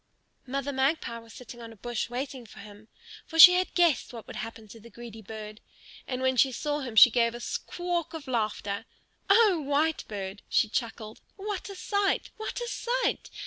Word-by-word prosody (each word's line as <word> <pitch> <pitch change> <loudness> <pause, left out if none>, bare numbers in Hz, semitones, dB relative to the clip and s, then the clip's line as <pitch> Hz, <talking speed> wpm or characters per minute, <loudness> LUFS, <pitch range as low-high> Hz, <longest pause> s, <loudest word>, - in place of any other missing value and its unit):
Mother 275 +2 -3
Magpie 265 -3 0
was 230 0 -16
sitting 240 0 -11
on 230 -1 -9
a - - -13
bush 240 +2 -4
waiting 255 +1 -5
for - - -16
him, 205 +1 -13 0.4
for 325 - -6
she 360 +2 +12
had 365 +1 0
guessed 345 -5 +2
what 230 -3 -9
would - - -9
happen 225 -1 -7
to 225 - -12
the 230 +2 -14
greedy 235 -2 -10
bird. 215 0 -9 0.5
And 255 0 -3
when 260 0 +1
she 265 +2 +4
saw 295 +4 -2
him 250 -5 -6
she 235 +3 +9
gave 235 0 +1
a - - -7
squawk 350 +5 -3
of 310 -4 -8
laughter. 215 -4 -2 0.4
"O 395 -5 +5
Whitebird," 270 -10 -2
she - - +3
chuckled, 225 -2 -4
"what 405 -1 -5
a 395 - -8
sight! 405 +1 -1
what 435 +2 -5
a 480 - -4
sight! - - -1
255 Hz, 185 wpm, -28 LUFS, 225-325 Hz, 0.5 s, she